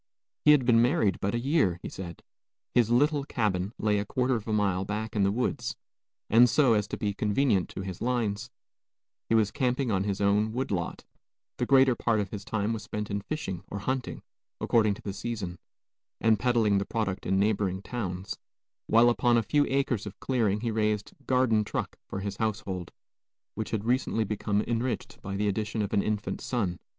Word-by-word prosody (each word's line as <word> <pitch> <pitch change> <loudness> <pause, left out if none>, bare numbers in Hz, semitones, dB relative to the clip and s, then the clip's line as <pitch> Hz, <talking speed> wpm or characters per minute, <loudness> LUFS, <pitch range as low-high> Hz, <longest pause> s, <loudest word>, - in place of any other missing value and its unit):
He - - +6
had 135 -4 +3
been 115 -2 +5
married 120 - +2
but 100 +3 0
a - - 0
year, 125 - +2
he - - -4
said; 85 -3 -8 0.5
his 120 -2 +4
little 145 +4 +3
cabin 105 -7 -1
lay 105 -1 +1
a 100 - -2
quarter 125 +4 0
of 115 -2 -3
a - - -1
mile 100 -3 +1
back 105 +3 -4
in 105 - +2
the 100 0 +3
woods, 125 +4 -1 0.5
and, 120 +3 +6
so 135 -4 +4
as 105 -1 +1
to - - -4
be 105 -1 -1
convenient 105 -1 +1
to - - -6
his 95 -2 -6
lines, 115 -2 -1 0.8
he 115 - +3
was 105 -2 +3
camping 130 -2 0
on 95 -1 +1
his 100 -1 -2
own 105 +2 +2
wood 130 0 -2
lot; 85 -4 -3 0.5
the - - -1
greater 135 -1 +6
part 115 -2 +1
of 100 -2 -3
his 100 -2 -6
time 110 +1 -1
was 110 - -4
spent 105 0 -5
in 100 0 -1
fishing 95 - -4
or - - -5
hunting, 130 +5 -3 0.4
according 110 -3 +2
to - - -14
the 100 - -4
season, 100 -6 -5 0.6
and 110 -2 +3
peddling 115 -5 +3
the - - 0
product 105 -5 -2
in 95 - +2
neighboring 100 -2 +1
towns, 95 -6 -4 0.5
while 115 +2 +6
upon 120 0 +3
a 115 - +2
few 145 +6 +2
acres 135 -7 0
of 100 - -9
clearing 110 -6 0
he 115 -1 -1
raised 105 -1 0 0.2
"garden 125 -4 +3
truck" 105 - -4
for 95 - -5
his 100 0 -4
household, 100 -5 -3 0.6
which - - -4
had 110 -1 -2
recently 120 -2 +1
become 105 0 -1
enriched 120 -1 -3
by 95 0 -5
the 105 +1 0
addition 105 +2 -1
of 100 - -4
an 100 - +3
infant 105 0 -2
son. 100 -8 -2
110 Hz, 195 wpm, -28 LUFS, 100-120 Hz, 0.8 s, He